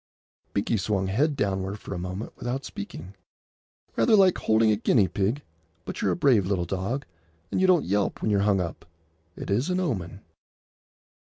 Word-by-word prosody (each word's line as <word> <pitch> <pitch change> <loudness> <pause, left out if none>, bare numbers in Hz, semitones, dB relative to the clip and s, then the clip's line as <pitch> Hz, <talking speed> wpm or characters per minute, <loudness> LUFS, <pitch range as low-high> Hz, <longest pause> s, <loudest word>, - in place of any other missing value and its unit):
Binkie 100 +3 +1
swung 95 -1 0
head 145 +9 +1
downward 95 -2 -1
for 100 - -7
a 90 - -4
moment 90 +4 -5
without 130 +3 -4
speaking. 95 -2 -8 0.8
"Rather 115 - +4
like 190 -3 +5
holding 110 0 +3
a - - +3
guinea 105 -1 +3
pig; 110 +11 -1 0.4
but - - -5
you're - - +2
a - - +1
brave 130 - +3
little 95 -3 0
dog, 100 - -3 0.5
and - - 0
you 190 - +4
don't 180 -4 +4
yelp 100 +2 0
when 110 - 0
you're 100 - +3
hung 100 -1 +3
up. 85 -1 -5 0.5
It - - -6
is 120 - +1
an 180 0 +1
omen." 100 - -3
105 Hz, 175 wpm, -26 LUFS, 95-130 Hz, 0.8 s, like